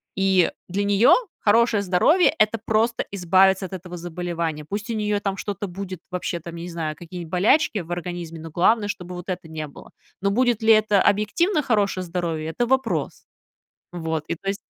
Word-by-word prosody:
и 190 -2 +3 0.2
для 195 +3 -1
нее 205 +4 +5 0.3
хорошее 225 0 +3
здоровье- 200 - +3
это 215 +1 +2
просто 225 +2 +1
избавиться 190 +1 +3
от 185 - -9
этого 180 -1 -7
заболевания. 170 -2 -4
Пусть 205 +8 -5
у - - -1
нее 210 -1 0
там 195 -1 -2
что-то 205 +1 -4
будет 185 0 -7
вообще, 180 -1 -3
там, 170 +1 -9
не 170 +1 -6
знаю, 160 -3 -4
какие-нибудь 170 0 -9
болячки 210 - +3
в 175 -1 -8
организме, 175 -2 -5
но 160 0 -9
главное, 205 +6 +3
чтобы 180 -2 -6
вот 180 0 -8
этого 180 -3 -5
не 155 -1 -5
было. 140 - -14 0.3
Но 200 - +2
будет 240 +1 +1
ли 220 0 +5
это 215 -2 +3
объективно 215 - +2
хорошее 205 -7 +1
здоровье- 165 -3 -3
это 240 +9 -1
вопрос. 265 -2 -1 0.7
Вот 160 -3 -3
и - - -2
то 185 - -12
есть 195 - 0
190 Hz, 185 wpm, -23 LUFS, 170-210 Hz, 0.7 s, нее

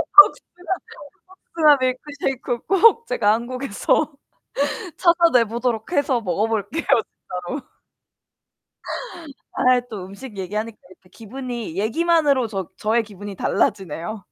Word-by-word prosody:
복숭아 365 -2 +5 0.8
복숭아 305 -3 +6
밀크쉐이크 255 -1 -2
꼭 455 +4 +5
제가 215 -4 +2
한국에서 255 +5 -1 0.8
찾아내 335 -9 +4
보도록 230 +3 -2
해서 275 -6 +2
먹어볼게요 215 - -1
진짜로. 220 +3 -2 1.8
아이 250 -1 +3
또 205 -5 -6
음식 200 +3 -10
얘기하니까 210 +4 -4
이렇게 185 0 -20
기분이 235 -4 -7
얘기만으로 280 - +2
저 195 -5 -5
저의 225 +2 +1
기분이 205 -1 -9
달라지네요. 190 +2 -1
235 Hz, 275 characters per minute, -22 LUFS, 205-280 Hz, 1.8 s, 복숭아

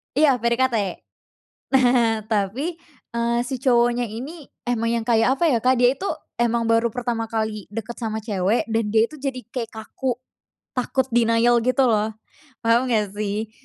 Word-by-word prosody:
Iya 280 -3 +4
PDKT. 235 +2 +1 1.0
Nah 245 -4 +4
tapi, 230 - -1 0.4
eee, 235 0 +1
si 265 - -3
cowoknya 240 -1 +2
ini 270 +9 -7 0.2
emang 230 -1 0
yang - - -8
kayak 230 +2 +4
apa 335 +2 +3
ya, 250 - +3
Kak, 255 +1 +4
dia 245 0 +6
itu 390 - -4 0.3
emang 235 -1 +1
baru 230 0 +2
pertama 240 -2 -2
kali 220 -2 -3
deket 225 +2 -5
sama 220 -2 -3
cewek, 205 +1 0
dan 225 0 +1
dia 225 +1 +4
itu 310 - -11
jadi 270 -2 -3
kayak 235 -2 -4
kaku, 235 +4 -3 0.6
takut 255 +1 0
denial 235 0 +4
gitu 255 +2 +2
loh, 215 -2 +2 0.6
paham 235 +3 +3
enggak 210 -4 +1
sih? 210 +1 -3
235 Hz, 160 wpm, -23 LUFS, 225-255 Hz, 1.0 s, dia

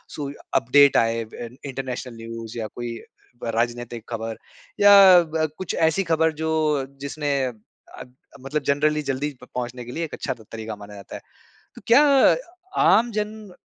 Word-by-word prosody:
सू 145 -2 -4
या 140 - -11 0.2
अपडेट 140 +3 +5
आए, 115 0 +1
अब 110 - -21
इन 120 +2 -8
इन्टरनेशनल 130 -2 -5
न्यूज़ 115 0 -8
या 110 - -3
कोई 120 -1 -5 0.5
व - - -3
राजनैतिक 120 0 -2
खबर 115 -1 -4 0.4
या 195 -3 +9
ब 160 0 -1
कुछ 185 - -3
ऐसी 160 +4 +2
खबर, 160 0 +3
जो 155 -3 0 0.2
जिसने 145 0 -2
अ 125 - -4 0.5
अ, - - -6 0.4
मतलब 140 +3 -2
जनरली 150 +2 +2
जल्दी 145 +3 -2
प 125 - -11
पहुँचने 125 0 -4
के 120 - -8
लिए 165 - -2
एक 155 - -12
अच्छा 130 - -3
त 110 -3 -18
तरीका 110 -1 -6
माना 105 0 -12
जाता 100 - -10
है। - - -8 0.5
तो - - -12
क्या 240 +5 +7 0.9
आमजन 215 -2 +1
135 Hz, 170 wpm, -23 LUFS, 115-160 Hz, 0.9 s, या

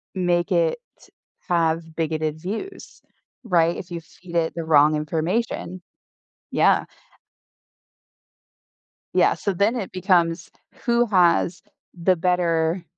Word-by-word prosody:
make 175 -2 0
it - - +2 0.7
have 165 -1 +1
bigoted 155 -1 -2
views, 225 - -7 0.4
right, 170 -5 +2
if 180 - -9
you 170 - -4
feed 170 +1 -13
it 165 -1 +1
the 165 - -3
wrong 155 -1 +4
information. 170 +4 -2 0.7
Yeah - - +3 2.3
Yeah, - - +4
so, 200 - -2
then 205 +7 +1
it 200 -5 -4
becomes, 175 -2 +1 0.3
"Who 235 0 +2
has 175 -3 +2 0.4
the 185 +2 +3
better, 170 -1 0
175 Hz, 105 wpm, -23 LUFS, 165-190 Hz, 2.3 s, wrong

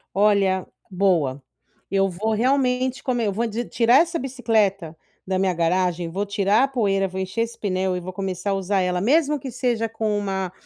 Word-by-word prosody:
Olha, 195 -2 +3 0.2
boa, 170 -8 +1 0.5
eu 195 0 +2
vou 215 +5 -2
realmente 255 +1 +1
come 240 -5 0
vou 230 +4 -1
ti 230 +3 -3
tirar 235 +2 +3
essa 335 0 +2
bicicleta 215 -10 0 0.3
da 190 0 -1
minha 190 -1 +1
garagem, 175 0 0
vou 200 +4 -2
tirar 205 +3 +2
a - - +3
poeira, 200 -7 0
vou 190 +1 -6
encher 190 +5 -3
esse 230 0 -3
pneu 185 -2 -1
e - - -2
vou 185 +1 -7
começar 190 0 -4
a - - +1
usar 195 +1 0
ela 180 0 0
mesmo 295 - +2
que 260 -1 -7
seja 235 -3 -1
com 215 -1 -2
uma 190 -2 -2
200 Hz, 185 wpm, -23 LUFS, 185-235 Hz, 0.5 s, Olha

